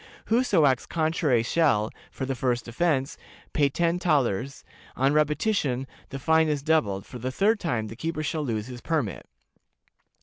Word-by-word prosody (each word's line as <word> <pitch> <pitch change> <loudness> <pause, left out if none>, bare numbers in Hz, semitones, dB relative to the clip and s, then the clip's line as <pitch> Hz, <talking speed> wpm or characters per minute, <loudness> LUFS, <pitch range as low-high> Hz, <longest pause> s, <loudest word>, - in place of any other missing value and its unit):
Whoso 220 -10 +4
acts 130 -3 +2
contrary 155 -7 +1
shall, 115 -6 +2 0.2
for 135 - -5
the 135 - -2
first 125 -2 -1
offense, 135 +1 0 0.3
pay 145 -2 +3
ten 170 +4 0
thalers; 140 - 0 0.3
on 135 +2 +2
repetition, 150 - +1 0.2
the 135 - -5
fine 160 +3 +3
is 145 -2 -1
doubled; 110 -12 +1
for 125 - -9
the 130 +2 -3
third 205 - +2
time, 120 - -1
the 110 +1 -8
keeper 160 +4 -3
shall 155 +1 -2
lose 110 -6 -2
his 125 -1 -9
permit. 150 - -2
140 Hz, 160 wpm, -26 LUFS, 125-160 Hz, 0.3 s, Whoso